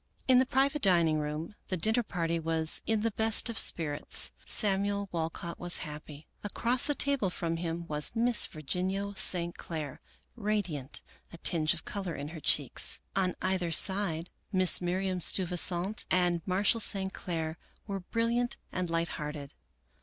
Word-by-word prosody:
In 255 Hz, -1 st, +6 dB
the 260 Hz, -, +2 dB
private 275 Hz, +3 st, +1 dB
dining 170 Hz, -5 st, +3 dB
room 150 Hz, +5 st, -5 dB
the 185 Hz, -, -2 dB
dinner 220 Hz, +8 st, +2 dB
party 170 Hz, -6 st, -2 dB
was 160 Hz, -1 st, +2 dB
in 220 Hz, -1 st, +1 dB
the 225 Hz, +1 st, 0 dB
best 220 Hz, +2 st, +2 dB
of 225 Hz, -, -3 dB
spirits. 150 Hz, -3 st, +2 dB, 0.2 s
Samuel 200 Hz, -1 st, +2 dB
Walcott 165 Hz, 0 st, -4 dB
was 175 Hz, 0 st, +2 dB
happy. 150 Hz, 0 st, -10 dB, 0.2 s
Across 240 Hz, +4 st, -1 dB
the 290 Hz, -, +1 dB
table 275 Hz, -10 st, +1 dB
from 165 Hz, -2 st, -3 dB
him 170 Hz, 0 st, -4 dB
was 150 Hz, +7 st, -1 dB
Miss 235 Hz, 0 st, +4 dB
Virginia 185 Hz, +6 st, -3 dB
St. 175 Hz, -2 st, +3 dB
Clair, 155 Hz, -5 st, -6 dB, 0.3 s
radiant, 200 Hz, -, -3 dB, 0.3 s
a 170 Hz, -, -10 dB
tinge 160 Hz, -1 st, 0 dB
of 170 Hz, -, -10 dB
color 190 Hz, -5 st, -5 dB
in 145 Hz, +1 st, -6 dB
her 165 Hz, 0 st, -9 dB
cheeks. 145 Hz, -3 st, +2 dB, 0.2 s
On 185 Hz, -2 st, 0 dB
either 185 Hz, -2 st, 0 dB
side, 175 Hz, -1 st, +2 dB, 0.2 s
Mrs, 185 Hz, -3 st, +4 dB
Miriam 185 Hz, +1 st, -1 dB
Steu 185 Hz, +2 st, +5 dB
visant 180 Hz, +5 st, +1 dB
and 175 Hz, -2 st, +1 dB
Marshall 200 Hz, +5 st, +2 dB
St. 195 Hz, -3 st, +1 dB
Clair 160 Hz, -2 st, -4 dB, 0.3 s
were 200 Hz, -2 st, -4 dB
brilliant 230 Hz, +5 st, -1 dB
and 180 Hz, -2 st, -3 dB
light 165 Hz, 0 st, 0 dB
hearted. 150 Hz, -1 st, -7 dB
180 Hz, 155 wpm, -30 LUFS, 165-205 Hz, 0.3 s, In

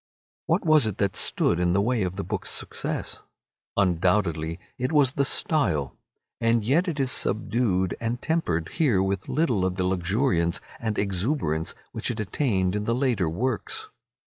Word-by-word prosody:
What 170 Hz, +3 st, +1 dB
was 155 Hz, -7 st, +5 dB
it 105 Hz, -, -3 dB
that 100 Hz, -2 st, 0 dB
stood 85 Hz, -, 0 dB
in 90 Hz, 0 st, +2 dB
the 100 Hz, -, +3 dB
way 120 Hz, +2 st, +1 dB
of 90 Hz, -1 st, -1 dB
the 100 Hz, -, -3 dB
book's 85 Hz, -, -4 dB
success? -, -, -3 dB, 0.6 s
Undoubtedly 90 Hz, -3 st, +1 dB, 0.2 s
it 125 Hz, +4 st, -1 dB
was 140 Hz, -4 st, +4 dB
the 140 Hz, -, +2 dB
style. 100 Hz, -, +1 dB, 0.4 s
And 115 Hz, -1 st, +2 dB
yet 150 Hz, -, +2 dB
it 160 Hz, -4 st, -2 dB
is 130 Hz, -2 st, +2 dB
subdued 110 Hz, -5 st, +1 dB
and 115 Hz, +1 st, -1 dB
tempered 85 Hz, -, -1 dB
here 115 Hz, -, +2 dB
with 95 Hz, -1 st, -2 dB
little 125 Hz, -, +1 dB
of 95 Hz, -1 st, 0 dB
the 95 Hz, -, -1 dB
luxuriance 90 Hz, -1 st, +1 dB, 0.2 s
and 110 Hz, -2 st, -2 dB
exuberance 95 Hz, -, -1 dB, 0.2 s
which -, -, -3 dB
it -, -, -3 dB
attained 100 Hz, -4 st, 0 dB
in 105 Hz, 0 st, -2 dB
the 115 Hz, -, +1 dB
later 120 Hz, -, +1 dB
works. 130 Hz, -, -2 dB
105 Hz, 165 wpm, -26 LUFS, 90-130 Hz, 0.6 s, was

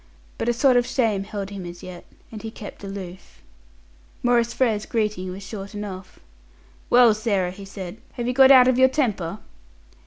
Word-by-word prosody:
But 235 Hz, -, 0 dB
a -, -, +3 dB
sort 250 Hz, +1 st, +4 dB
of 245 Hz, 0 st, +2 dB
shame 215 Hz, -6 st, 0 dB
held 200 Hz, -1 st, -6 dB
him 195 Hz, -2 st, -6 dB
as 175 Hz, 0 st, -9 dB
yet, 180 Hz, -1 st, -9 dB, 0.3 s
and 215 Hz, -2 st, -8 dB
he 225 Hz, -, -6 dB
kept 210 Hz, -2 st, -10 dB
aloof. 190 Hz, -2 st, -9 dB, 0.8 s
Maurice 240 Hz, -1 st, +2 dB
Frere's 220 Hz, -5 st, 0 dB
greeting 210 Hz, -5 st, -2 dB
was 195 Hz, +2 st, -8 dB
short 200 Hz, +1 st, -8 dB
enough. 195 Hz, -3 st, -7 dB, 0.7 s
"Well, 240 Hz, -2 st, +6 dB
Sarah," 205 Hz, -5 st, -1 dB
he 195 Hz, +2 st, -10 dB
said, 195 Hz, -1 st, -8 dB, 0.2 s
"have 240 Hz, -, -4 dB
you 250 Hz, -, 0 dB
got 265 Hz, +1 st, +7 dB
out 255 Hz, -2 st, +8 dB
of 255 Hz, 0 st, +3 dB
your 260 Hz, 0 st, +6 dB
temper?" 215 Hz, -, -1 dB
210 Hz, 180 wpm, -23 LUFS, 195-240 Hz, 0.8 s, out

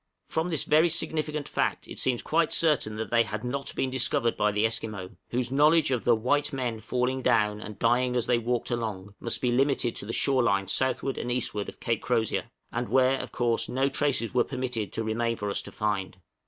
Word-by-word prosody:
From 160 Hz, +2 st, -1 dB
this 160 Hz, -5 st, +1 dB
very 155 Hz, +3 st, +4 dB
significant 155 Hz, -2 st, -2 dB
fact -, -, -1 dB
it -, -, -7 dB
seems 125 Hz, -2 st, 0 dB
quite 165 Hz, 0 st, +1 dB
certain 150 Hz, -10 st, +2 dB
that 110 Hz, +1 st, -5 dB
they 115 Hz, -1 st, +5 dB
had 105 Hz, -1 st, -3 dB
not 135 Hz, +3 st, -3 dB
been 130 Hz, -, -1 dB
discovered 120 Hz, -2 st, +2 dB
by 105 Hz, 0 st, +2 dB
the 105 Hz, +2 st, +1 dB
Esquimaux, 110 Hz, -4 st, -3 dB, 0.2 s
whose 125 Hz, 0 st, -1 dB
knowledge 150 Hz, +2 st, +4 dB
of 125 Hz, -3 st, -1 dB
the 120 Hz, -, +5 dB
"white 145 Hz, +6 st, +1 dB
men 125 Hz, -5 st, -2 dB
falling 125 Hz, +4 st, -1 dB
down 105 Hz, -3 st, +2 dB
and 105 Hz, -2 st, -8 dB
dying 125 Hz, +3 st, +2 dB
as 120 Hz, -1 st, +1 dB
they 120 Hz, -1 st, +2 dB
walked 120 Hz, +1 st, -2 dB
along" 105 Hz, -4 st, -3 dB
must 115 Hz, -, -3 dB
be 125 Hz, -, +1 dB
limited 130 Hz, -1 st, +1 dB
to 100 Hz, -, -5 dB
the -, -, -3 dB
shore 130 Hz, +2 st, +2 dB
line 100 Hz, -4 st, +1 dB
southward 130 Hz, +4 st, 0 dB
and 120 Hz, -, -3 dB
eastward 110 Hz, -4 st, -2 dB
of -, -, -13 dB
Cape 115 Hz, -3 st, -1 dB
Crozier, 115 Hz, -3 st, 0 dB, 0.2 s
and 120 Hz, +1 st, -3 dB
where, 130 Hz, +1 st, +3 dB
of -, -, -6 dB
course, 120 Hz, -1 st, 0 dB
no 135 Hz, +2 st, +1 dB
traces 135 Hz, -5 st, +1 dB
were 125 Hz, -, +4 dB
permitted 125 Hz, -6 st, -3 dB
to 115 Hz, -, -2 dB
remain 115 Hz, +1 st, 0 dB
for 105 Hz, -2 st, -3 dB
us -, -, -2 dB
to -, -, -9 dB
find. 100 Hz, -3 st, -2 dB
120 Hz, 215 wpm, -27 LUFS, 110-130 Hz, 0.2 s, they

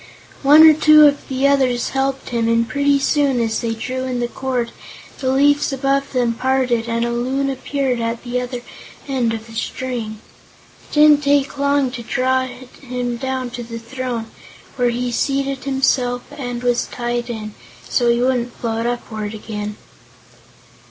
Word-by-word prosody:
One 295 Hz, +3 st, +8 dB
or 315 Hz, -, +8 dB
two 305 Hz, 0 st, +7 dB
of 285 Hz, -1 st, +2 dB
the 265 Hz, +1 st, +1 dB
others 260 Hz, -4 st, +2 dB
helped 270 Hz, 0 st, -2 dB
him 235 Hz, -2 st, 0 dB
and 230 Hz, 0 st, +2 dB
pretty 280 Hz, +4 st, +2 dB
soon, 275 Hz, -2 st, +1 dB
as 225 Hz, -1 st, 0 dB
they 230 Hz, -2 st, -2 dB
drew 255 Hz, +3 st, -4 dB
in 250 Hz, -1 st, -2 dB
the 240 Hz, -, 0 dB
cord, 250 Hz, -1 st, -3 dB, 0.5 s
the 260 Hz, -1 st, 0 dB
leaves 290 Hz, +2 st, +3 dB
above 275 Hz, +1 st, 0 dB
them 245 Hz, -3 st, +1 dB
parted 250 Hz, -2 st, 0 dB
and 230 Hz, 0 st, 0 dB
a 235 Hz, -, -1 dB
Loon 265 Hz, +3 st, -1 dB
appeared 265 Hz, -1 st, -2 dB
at 230 Hz, 0 st, -3 dB
the 250 Hz, 0 st, -2 dB
other 250 Hz, 0 st, -5 dB, 0.5 s
end 255 Hz, -4 st, 0 dB
of 225 Hz, -1 st, -5 dB
the 225 Hz, -, -13 dB
string. 225 Hz, -2 st, -4 dB, 0.7 s
It -, -, -15 dB
didn't 300 Hz, -1 st, +6 dB
take 280 Hz, 0 st, +1 dB
long 280 Hz, -2 st, +2 dB
to 250 Hz, -2 st, -6 dB
draw 260 Hz, +2 st, 0 dB
him 250 Hz, -1 st, -6 dB
down 260 Hz, -1 st, -3 dB
to 245 Hz, 0 st, -6 dB
the 230 Hz, 0 st, -7 dB
throne, 235 Hz, 0 st, -4 dB, 0.5 s
where 245 Hz, -2 st, +2 dB
he 245 Hz, +1 st, -2 dB
seated 275 Hz, +2 st, -1 dB
himself 260 Hz, -2 st, +1 dB
and 245 Hz, -4 st, -5 dB
was 245 Hz, -1 st, +1 dB
tied 240 Hz, 0 st, -3 dB
in, 215 Hz, -2 st, -5 dB, 0.3 s
so 240 Hz, -2 st, +2 dB
he 235 Hz, 0 st, +2 dB
wouldn't 245 Hz, -1 st, 0 dB
float 230 Hz, 0 st, -2 dB
upward 220 Hz, -3 st, -4 dB
again. 210 Hz, -1 st, -6 dB
250 Hz, 165 wpm, -19 LUFS, 235-270 Hz, 0.7 s, One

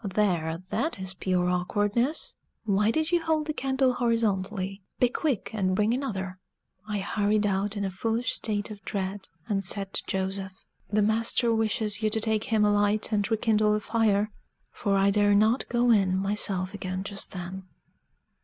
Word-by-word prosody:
"There, 180 Hz, -5 st, 0 dB
that 320 Hz, -, -1 dB
is 190 Hz, 0 st, -5 dB
pure 180 Hz, -1 st, 0 dB
awkwardness! 205 Hz, -, 0 dB, 0.3 s
Why 210 Hz, 0 st, +2 dB
did 315 Hz, +7 st, 0 dB
you 345 Hz, -1 st, +3 dB
hold 315 Hz, -2 st, +1 dB
the 305 Hz, -, -2 dB
candle 265 Hz, -2 st, +1 dB
horizontally? 205 Hz, -5 st, -1 dB, 0.2 s
Be 250 Hz, -, +4 dB
quick, 270 Hz, -3 st, -1 dB
and 185 Hz, -3 st, 0 dB
bring 210 Hz, +3 st, +2 dB
another." 190 Hz, -8 st, -3 dB, 0.5 s
I 210 Hz, -1 st, -2 dB
hurried 205 Hz, +1 st, +1 dB
out 200 Hz, +1 st, 0 dB
in 200 Hz, -, -1 dB
a 190 Hz, -, -2 dB
foolish 225 Hz, +6 st, -1 dB
state 210 Hz, -1 st, -1 dB
of 205 Hz, -1 st, -10 dB
dread, 195 Hz, 0 st, -4 dB, 0.2 s
and 195 Hz, -2 st, 0 dB
said 195 Hz, +1 st, -2 dB
to -, -, +2 dB
Joseph, 190 Hz, 0 st, -3 dB, 0.3 s
"The 210 Hz, 0 st, +2 dB
master 230 Hz, +2 st, +2 dB
wishes 215 Hz, -2 st, 0 dB
you 215 Hz, -, +2 dB
to 220 Hz, +1 st, 0 dB
take 220 Hz, -1 st, +1 dB
him 215 Hz, -2 st, +2 dB
a 205 Hz, -, +4 dB
light 205 Hz, +2 st, +1 dB
and 205 Hz, -1 st, +1 dB
rekindle 215 Hz, -1 st, +2 dB
the 210 Hz, -, +1 dB
fire." 215 Hz, -1 st, +1 dB, 0.4 s
For 200 Hz, -1 st, 0 dB
I 195 Hz, +1 st, +4 dB
dare 205 Hz, 0 st, +4 dB
not 220 Hz, +5 st, +3 dB
go 240 Hz, 0 st, +3 dB
in 190 Hz, -4 st, +3 dB
myself 195 Hz, -1 st, -1 dB
again 185 Hz, -1 st, -4 dB
just 200 Hz, 0 st, -5 dB
then. 185 Hz, +1 st, -6 dB
205 Hz, 170 wpm, -27 LUFS, 195-225 Hz, 0.5 s, Be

